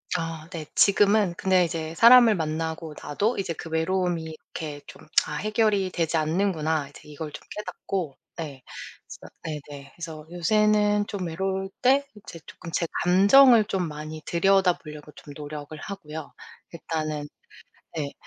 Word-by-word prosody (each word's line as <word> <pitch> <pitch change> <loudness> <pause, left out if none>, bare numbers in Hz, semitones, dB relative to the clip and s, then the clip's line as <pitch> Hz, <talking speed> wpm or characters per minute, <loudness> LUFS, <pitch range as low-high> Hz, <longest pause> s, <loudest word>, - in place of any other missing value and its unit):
아 165 -2 -4
네. 165 -4 -6
지금은 200 -1 +4
근데 185 -2 +3
이제 160 -1 -4
사람을 235 +1 +8
만나고 160 -1 -3
나도 205 +11 -1
이제 190 -3 -2
그 165 - -9
외로움이 170 +1 0
이렇게 155 -1 -7
좀 - - -13 0.2
'아 - - -6
해결이 210 0 +1
되지 165 -2 -1
않는구나.' 160 -2 0
이제 145 - -15
이걸 150 +1 -7
좀 - - -9
깨닫고 190 -7 -4 0.2
네. 145 -6 -7 0.6
그래서 - - -13 0.4
네네. 140 -1 -10
그래서 160 -3 -8
요새는 210 +3 +2
좀 190 -4 -4
외로울 190 +3 -2
때 275 +3 +3
이제 200 -5 -11
쪼금 170 - -10
제 170 - 0 0.2
감정을 215 +6 +7
좀 190 -4 -1
많이 155 +1 -7
들여다보려고 170 -5 +1
좀 145 - -12
노력을 150 0 -8
하고요. 155 -4 -8 0.4
일단은 155 -3 -4 0.7
네. 145 -2 -3
170 Hz, 300 characters per minute, -25 LUFS, 155-195 Hz, 0.7 s, 사람을